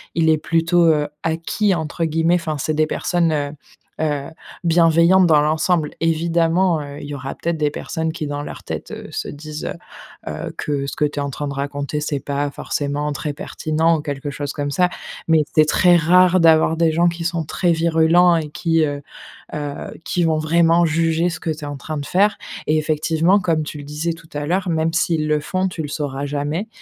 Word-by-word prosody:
il 160 Hz, -1 st, +3 dB
est 160 Hz, -, +4 dB
plutôt, 165 Hz, +2 st, +2 dB
heu, 150 Hz, -1 st, +1 dB, 0.2 s
«acquis» 165 Hz, +5 st, 0 dB
entre 160 Hz, +1 st, -3 dB
guillemets. 165 Hz, +2 st, +2 dB
Enfin, 160 Hz, -3 st, -2 dB
c'est 155 Hz, -, -1 dB
des 155 Hz, 0 st, +2 dB
personnes, 170 Hz, 0 st, 0 dB
heu 145 Hz, -2 st, -1 dB, 0.5 s
heu, 145 Hz, -3 st, -1 dB, 0.4 s
bienveillantes 170 Hz, +2 st, +5 dB
dans 155 Hz, -3 st, +5 dB
l'ensemble. 155 Hz, +1 st, +1 dB
Évidemment, 165 Hz, +1 st, +2 dB
heu, 145 Hz, 0 st, -8 dB
il -, -, -7 dB
y 145 Hz, -, -5 dB
aura 135 Hz, 0 st, -5 dB
peut-être 170 Hz, -1 st, -2 dB
des 150 Hz, -1 st, 0 dB
personnes 160 Hz, +1 st, -3 dB
qui 160 Hz, -3 st, -4 dB
dans 145 Hz, 0 st, -4 dB
leur -, -, -8 dB
tête, -, -, -6 dB
heu, -, -, -7 dB
se -, -, -4 dB
disent, 150 Hz, +1 st, -7 dB, 0.6 s
heu -, -, -2 dB
heu, -, -, -6 dB
que 140 Hz, -2 st, -2 dB
ce -, -, -5 dB
que 150 Hz, -, +1 dB
tu 145 Hz, 0 st, -4 dB
es -, -, 0 dB
en 140 Hz, -, -3 dB
train 145 Hz, +2 st, -4 dB
de 140 Hz, -, -4 dB
raconter, 140 Hz, +1 st, -3 dB
c'est 150 Hz, -1 st, -2 dB
pas 140 Hz, +1 st, -2 dB
forcément 145 Hz, +1 st, -2 dB
très 145 Hz, +1 st, -3 dB
pertinent 160 Hz, +2 st, 0 dB
ou -, -, -4 dB
quelque 145 Hz, -1 st, -4 dB
chose 145 Hz, +1 st, -4 dB
comme 145 Hz, 0 st, -3 dB
ça. 180 Hz, +4 st, +2 dB, 0.4 s
Mais 160 Hz, -2 st, +4 dB
c'est 155 Hz, -, +6 dB
très 175 Hz, +3 st, +4 dB
rare 180 Hz, +2 st, +5 dB
d'avoir 160 Hz, -1 st, +4 dB
des 165 Hz, -1 st, +3 dB
gens 170 Hz, +2 st, +3 dB
qui 170 Hz, 0 st, -5 dB
sont 170 Hz, -1 st, -1 dB
très 175 Hz, +3 st, 0 dB
virulents 170 Hz, +1 st, +4 dB
et 155 Hz, -2 st, -2 dB
qui, 165 Hz, 0 st, +1 dB
heu 145 Hz, -1 st, -4 dB, 0.5 s
heu, 145 Hz, -1 st, -5 dB
qui 180 Hz, -4 st, 0 dB
vont 160 Hz, -1 st, +2 dB
vraiment 170 Hz, +2 st, +3 dB
juger 165 Hz, +2 st, +1 dB
ce 180 Hz, -, -6 dB
que 165 Hz, -, -4 dB
tu 155 Hz, 0 st, -6 dB
es -, -, -5 dB
en 145 Hz, -1 st, -5 dB
train 155 Hz, +2 st, -5 dB
de 140 Hz, -, -4 dB
faire. 205 Hz, +5 st, +2 dB, 0.3 s
Et 155 Hz, -, +3 dB
effectivement, 160 Hz, +4 st, +2 dB
comme 165 Hz, -4 st, 0 dB
tu 150 Hz, 0 st, -7 dB
le -, -, -8 dB
disais 150 Hz, +4 st, -3 dB
tout 165 Hz, 0 st, -15 dB
à 145 Hz, 0 st, -3 dB
l'heure, 185 Hz, +4 st, 0 dB
même 160 Hz, 0 st, 0 dB
s'ils 165 Hz, -2 st, +1 dB
le 150 Hz, 0 st, +2 dB
font, 185 Hz, +5 st, -1 dB
tu 175 Hz, -3 st, -5 dB
le 150 Hz, -, -4 dB
sauras 140 Hz, -1 st, -3 dB
jamais. 145 Hz, +7 st, -2 dB
160 Hz, 215 wpm, -20 LUFS, 150-170 Hz, 0.6 s, c'est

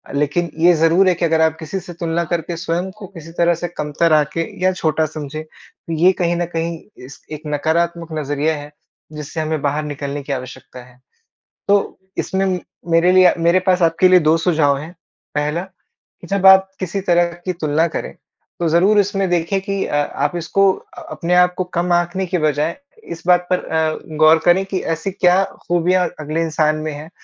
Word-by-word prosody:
लेकिन 150 Hz, +4 st, 0 dB
ये 175 Hz, +1 st, +6 dB
ज़रूर 165 Hz, +4 st, +3 dB
है -, -, +3 dB
कि 170 Hz, -, -1 dB
अगर 160 Hz, -1 st, +2 dB
आप 160 Hz, 0 st, +2 dB
किसी 165 Hz, +4 st, -4 dB
से 175 Hz, -1 st, -10 dB
तुलना 170 Hz, 0 st, -2 dB
करके 170 Hz, 0 st, -2 dB
स्वयं 175 Hz, +2 st, -2 dB
को 200 Hz, -3 st, -9 dB
किसी 165 Hz, -3 st, -12 dB
तरह 170 Hz, 0 st, +3 dB
से -, -, 0 dB
कमतर 160 Hz, 0 st, 0 dB
आँके 155 Hz, +2 st, +1 dB, 0.2 s
या 185 Hz, -, +4 dB
छोटा 160 Hz, -2 st, 0 dB
समझें, 155 Hz, 0 st, -6 dB
तो 165 Hz, +1 st, -12 dB
ये 175 Hz, +4 st, +4 dB
कहीं 175 Hz, 0 st, +1 dB
न 175 Hz, 0 st, -1 dB
कहीं 165 Hz, 0 st, -2 dB, 0.3 s
इस 135 Hz, -, -13 dB
एक 155 Hz, -, -6 dB
नकारात्मक 165 Hz, +3 st, -1 dB
नज़रिया 145 Hz, +2 st, -1 dB
है, 145 Hz, 0 st, -9 dB, 0.4 s
जिससे 150 Hz, +1 st, -7 dB
हमें 155 Hz, -1 st, -2 dB
बाहर 145 Hz, +1 st, -1 dB
निकलने 145 Hz, -1 st, -5 dB
की 140 Hz, -, -3 dB
आवश्यकता 125 Hz, -1 st, -8 dB
है। 125 Hz, 0 st, -20 dB, 0.7 s
तो 200 Hz, 0 st, +1 dB, 0.2 s
इसमें 190 Hz, -1 st, -1 dB, 0.3 s
मेरे 165 Hz, +2 st, +4 dB
लिए 185 Hz, -1 st, +6 dB
मेरे 170 Hz, +2 st, +3 dB
पास 185 Hz, -1 st, +3 dB
आपके 165 Hz, +2 st, +4 dB
लिए 185 Hz, -1 st, +7 dB
2 165 Hz, -, +4 dB
सुझाव 155 Hz, -5 st, +2 dB
हैं। 155 Hz, +4 st, -8 dB, 0.4 s
पहला, 150 Hz, +3 st, -1 dB, 0.6 s
कि 175 Hz, -, -11 dB
जब 195 Hz, 0 st, -1 dB
आप 190 Hz, 0 st, +7 dB
किसी 185 Hz, +1 st, -3 dB
तरह 175 Hz, -2 st, +2 dB
की 185 Hz, -, -1 dB
तुलना 160 Hz, 0 st, 0 dB
करें, -, -, -5 dB, 0.5 s
तो 170 Hz, -, 0 dB
ज़रूर 190 Hz, +6 st, +4 dB
इसमें 195 Hz, -1 st, 0 dB
देखें 175 Hz, +3 st, 0 dB
कि 195 Hz, -1 st, -2 dB
अ, -, -, -3 dB
आप 145 Hz, +2 st, -1 dB
इसको 190 Hz, +4 st, +2 dB
अ -, -, -13 dB
अपने 175 Hz, +1 st, -2 dB
आप 180 Hz, 0 st, +4 dB
को 185 Hz, -, 0 dB
कम 175 Hz, +1 st, 0 dB
आकने 175 Hz, +2 st, 0 dB
की 180 Hz, 0 st, -1 dB
बजाय 155 Hz, +1 st, 0 dB, 0.3 s
इस 165 Hz, -, -9 dB
बात 180 Hz, 0 st, +4 dB
पर 180 Hz, -, +3 dB
अ, 160 Hz, 0 st, -2 dB
गौर 155 Hz, +1 st, +6 dB
करें 175 Hz, +2 st, +4 dB
कि 190 Hz, -1 st, -3 dB, 0.2 s
ऐसी 175 Hz, +5 st, -4 dB
क्या 185 Hz, 0 st, +3 dB, 0.2 s
खूबियाँ 175 Hz, +1 st, +2 dB
अगले 155 Hz, +2 st, -2 dB
इंसान 155 Hz, -1 st, +1 dB
में 155 Hz, 0 st, -4 dB
हैं, 150 Hz, +2 st, -9 dB
165 Hz, 195 wpm, -19 LUFS, 155-180 Hz, 0.7 s, लिए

